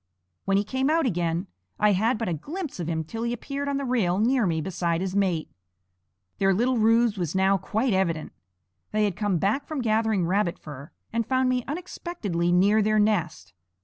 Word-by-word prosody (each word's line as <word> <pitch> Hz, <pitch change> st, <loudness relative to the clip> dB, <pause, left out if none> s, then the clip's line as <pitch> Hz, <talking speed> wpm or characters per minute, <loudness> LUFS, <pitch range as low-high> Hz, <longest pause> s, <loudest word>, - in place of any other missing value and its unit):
When 195 Hz, 0 st, +2 dB
he 200 Hz, -, +2 dB
came 260 Hz, +6 st, -1 dB
out 325 Hz, 0 st, +2 dB
again 175 Hz, -4 st, -1 dB, 0.3 s
I 210 Hz, 0 st, +4 dB
had 220 Hz, +5 st, +2 dB
but 225 Hz, -1 st, -3 dB
a 175 Hz, -, 0 dB
glimpse 295 Hz, -, -6 dB
of 170 Hz, -, -3 dB
him 160 Hz, -1 st, -1 dB
till 225 Hz, +9 st, -6 dB
he 235 Hz, 0 st, -1 dB
appeared 280 Hz, +4 st, -4 dB
on 280 Hz, -, 0 dB
the 280 Hz, -, -3 dB
rail 215 Hz, -8 st, +1 dB
near 235 Hz, +1 st, +2 dB
me 165 Hz, -2 st, 0 dB
beside 170 Hz, 0 st, -1 dB
his 190 Hz, +1 st, -3 dB
mate. 185 Hz, -, 0 dB, 0.9 s
Their 195 Hz, -1 st, +3 dB
little 245 Hz, +3 st, +1 dB
ruse 225 Hz, -1 st, +3 dB
was 170 Hz, -1 st, -2 dB
now 190 Hz, +1 st, +3 dB
quite 220 Hz, +5 st, 0 dB
evident. 170 Hz, -5 st, 0 dB, 0.6 s
They 215 Hz, 0 st, +1 dB
had 200 Hz, -4 st, -1 dB
come 205 Hz, -3 st, 0 dB
back 215 Hz, -, 0 dB
from 310 Hz, -3 st, -4 dB
gathering 220 Hz, -5 st, +1 dB
rabbit 185 Hz, 0 st, 0 dB
fur, 145 Hz, -1 st, -10 dB, 0.2 s
and 230 Hz, 0 st, +1 dB
found 260 Hz, +2 st, +1 dB
me 250 Hz, -1 st, 0 dB
unexpectedly 285 Hz, -, -3 dB
near 200 Hz, +5 st, +4 dB
their 215 Hz, +1 st, +2 dB
nest. 170 Hz, -, 0 dB
210 Hz, 195 wpm, -26 LUFS, 175-240 Hz, 0.9 s, I